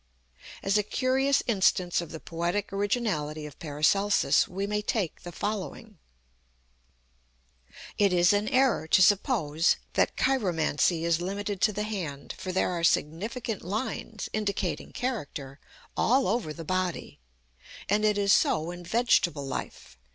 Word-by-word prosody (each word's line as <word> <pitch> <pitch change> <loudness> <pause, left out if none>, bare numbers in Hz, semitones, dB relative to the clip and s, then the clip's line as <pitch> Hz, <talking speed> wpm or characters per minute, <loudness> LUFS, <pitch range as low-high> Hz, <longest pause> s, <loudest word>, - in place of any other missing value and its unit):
As 195 +2 +2
a - - +4
curious 260 +5 +1
instance 185 -5 +2
of 170 - -8
the 160 - -7
poetic 175 +6 -3
originality 195 -8 -1
of 145 -2 -11
PARACELSUS 165 +7 +2
we 195 +2 -3
may 210 +1 -1
take 210 -5 -2
the 175 - -8
following: 210 +1 -5 2.0
"It 200 -2 +4
is 175 +1 +4
an 205 +1 +1
error 260 - +2
to 185 - +4
suppose 180 - +3 0.2
that - - +1
chiromancy 175 - +1
is 170 0 +1
limited 200 +1 -3
to 215 - +4
the 210 +1 -3
hand, 175 -10 -5
for 185 - -5
there 185 0 +1
are 170 -2 -3
significant 210 - 0
lines 215 +2 -4
(indicating 200 -3 -2
character), 145 - -4 0.4
all 260 0 +3
over 210 -5 -1
the 165 +1 -8
body. 185 +1 -2 0.7
And 210 +2 +1
it 210 -1 +3
is 200 -1 +3
so 160 +2 +2
in 175 0 -9
vegetable 175 - +2
life. 70 - -7
195 Hz, 135 wpm, -28 LUFS, 165-215 Hz, 2.0 s, a